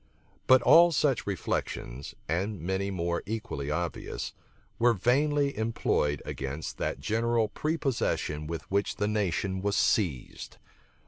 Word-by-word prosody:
But 130 -1 +6
all 170 +1 +7
such 140 -7 +1
reflections, 70 -8 -3
and 95 +5 -1
many 95 +4 -1
more 85 -2 -1
equally 105 -10 -4
obvious, 85 +3 -3 0.5
were 120 0 +5
vainly 140 +6 +2
employed 105 - 0
against 70 +3 -5
that - - -2
general 115 +7 +1
prepossession 135 - -1
with 85 0 -4
which 100 +1 +1
the 105 - 0
nation 95 -2 -1
was 100 +1 0
seized. 80 - 0
100 Hz, 120 wpm, -29 LUFS, 85-120 Hz, 0.5 s, all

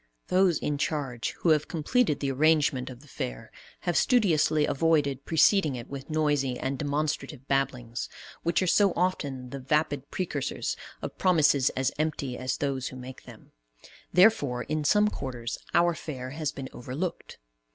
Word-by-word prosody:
Those 185 -3 +4
in 145 -1 -2
charge, 135 -6 -2
who 170 - +2
have 155 -2 +3
completed 165 - +1
the 140 -1 0
arrangement 145 -2 +2
of 125 -1 -10
the 150 - -18
Fair, - - -6 0.3
have 175 - -1
studiously 160 - +3
avoided 145 -3 +1
preceding 160 -2 +4
it 120 +2 -8
with 140 +1 -7
noisy 145 -5 +1
and 130 +1 -3
demonstrative 145 -2 -2
babblings, 125 -4 -1 0.3
which 170 +2 +1
are - - +1
so 195 +1 +4
often 140 -8 -1
the 140 - -5
vapid 145 0 0
precursors 155 -7 -2 0.3
of - - -6
promises 150 -7 +4
as 130 0 +1
empty 150 -5 -1
as 130 +1 -2
those 135 -2 -2
who - - -8
make 130 0 -10
them; - - -14 0.6
therefore, 145 - +4
in 155 0 -2
some 210 +8 +4
quarters, 125 - -4 0.2
our 170 0 +4
Fair 130 -6 -6
has 150 0 -2
been 135 -3 -7
overlooked. 140 +9 -5
145 Hz, 155 wpm, -28 LUFS, 130-160 Hz, 0.6 s, Those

